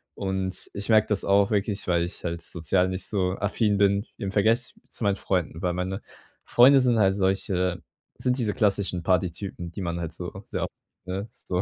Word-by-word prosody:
und 95 -1 -3
ich 100 +2 -4
merke 110 -1 +5
das 105 -2 0
auch 100 +1 +4
wirklich, 105 0 -1
weil 85 -2 +2
ich 90 +3 -5
halt 85 -1 -3
sozial 90 +3 0
nicht 95 0 -4
so 95 -3 0
affin 105 0 +1
bin 100 +1 +3
im 100 - -3
Vergleich 110 +5 +2 0.2
zu - - -7
meinen 100 -1 +3
Freunden, 90 -4 -2
weil 90 -1 0
meine 95 +3 -3 0.4
Freunde 135 +3 +6
sind 125 -2 +3
halt 95 -3 +4
solche 95 -2 0 0.4
sind 125 +1 +1
diese 110 -4 0
klassischen 100 -4 +1
Partytypen, 90 0 -1
die 100 - -6
man 85 -1 -2
halt 85 -1 -4
so - - -6 0.2
sehr - - -3
oft, - - -4 0.3
ne? 95 +4 -4
So, 90 0 -3
95 Hz, 190 wpm, -26 LUFS, 90-105 Hz, 0.4 s, Freunde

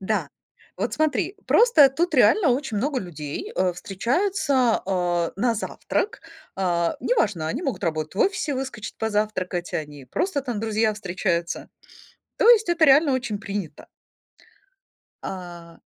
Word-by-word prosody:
Да, 215 +3 -1 0.5
вот - - -2
смотри, 310 +5 0
просто 455 - +6
тут 335 +7 -1
реально 365 -10 +5
очень 255 -3 -1
много 270 +4 0
людей, 150 -5 -6
э, 185 -1 +1
встречаются, 255 - 0
а, 175 -3 0
на 230 +3 +1
завтрак. 305 - -3 0.4
А, 170 -3 0
неважно, 205 - 0
они 255 - -3
могут 235 - -3
работать 155 -1 -2
в - - -7
офисе, 380 -7 +1
выскочить 255 -5 -5
позавтракать, 205 -5 -2
они 145 -3 -5
просто 295 - -2
там, 245 -6 -4
друзья, 220 0 +1
встречаются. 180 -4 -2 0.7
То 460 - +5
есть 440 -5 +6
это 340 -2 +4
реально 285 +1 +5
очень 240 -5 -2
принято. 195 -7 -6 1.4
А 175 -3 -8
215 Hz, 130 wpm, -24 LUFS, 180-280 Hz, 1.4 s, просто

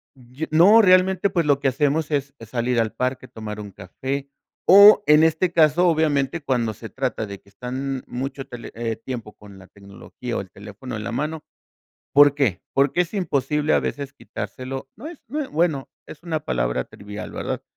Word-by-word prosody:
Yo 130 +4 -7
no, 195 +8 +7
realmente, 185 0 +4
pues, 170 -4 0
lo 140 -1 +3
que 140 - +2
hacemos 145 +4 0
es 140 -1 -2
salir 120 +1 -1
al 110 -1 0
parque, 130 0 -3
tomar 105 -2 -7
un 105 -1 -8
café, 135 +10 -5 0.4
o 205 +2 +9
en 150 +1 +6
este 160 +3 +2
caso, 170 +1 +4
obviamente, 155 -2 +1
cuando 120 -5 -1
se 115 +2 -9
trata 130 -4 -3
de 100 -1 -8
que 100 - -23
están 130 +5 -5
mucho 135 +2 -5
tele 120 -3 -9 0.3
tiempo 115 -2 -7
con 100 -2 -15
la 95 - -14
tecnología 100 +5 -8
o - - -2
el 95 - -12
teléfono 105 +5 -9
en 105 - -5
la 105 - -4
mano, 150 +5 -3 0.7
¿por 145 0 +7
qué? 125 -11 0
Porque 140 +5 +2
es 175 +2 -5
imposible 150 -5 0
a - - +4
veces 140 -1 -4
quitárselo. 135 -1 -7
No 300 - -8
es 335 -2 -11
no 295 +5 -3
es, 285 - -4
bueno, 155 -4 0 0.2
es 155 - -12
una 160 -3 -2
palabra - - -1
trivial, 105 +1 -9
¿verdad? - - -4
135 Hz, 185 wpm, -22 LUFS, 115-160 Hz, 0.7 s, o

